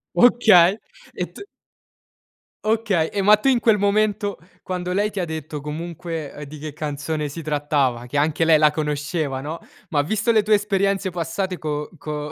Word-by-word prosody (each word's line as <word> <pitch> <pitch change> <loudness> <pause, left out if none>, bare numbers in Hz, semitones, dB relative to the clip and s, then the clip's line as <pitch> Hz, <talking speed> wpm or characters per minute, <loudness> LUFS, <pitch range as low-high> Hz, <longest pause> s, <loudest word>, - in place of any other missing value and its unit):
Okay, 215 -6 +6 0.4
e - - -2
t - - -11 1.2
Okay, 215 -7 +1
e 200 - -1
ma 210 +2 +7
tu 270 +6 +1
in 250 -3 +3
quel 225 -3 +3
momento, 205 0 +1 0.2
quando 180 -1 -3
lei 205 +3 +1
ti 200 - -4
ha 180 - 0
detto 155 -2 -6
comunque 160 -1 -6
di 155 - -9
che 150 0 -7
canzone 150 0 -3
si 165 +4 -7
trattava, 145 -5 0
che 145 - -3
anche 155 +2 +2
lei 160 -1 +6
la 150 -1 +5
conosceva, 150 -2 -2
no, 155 +4 -5 0.3
ma 145 -3 +2
visto 215 +9 0
le 220 -2 +4
tue 210 +1 +3
esperienze 195 -2 0
passate 175 +2 -3
co 150 -1 -3
co 150 -1 -5
165 Hz, 170 wpm, -22 LUFS, 150-200 Hz, 1.2 s, ma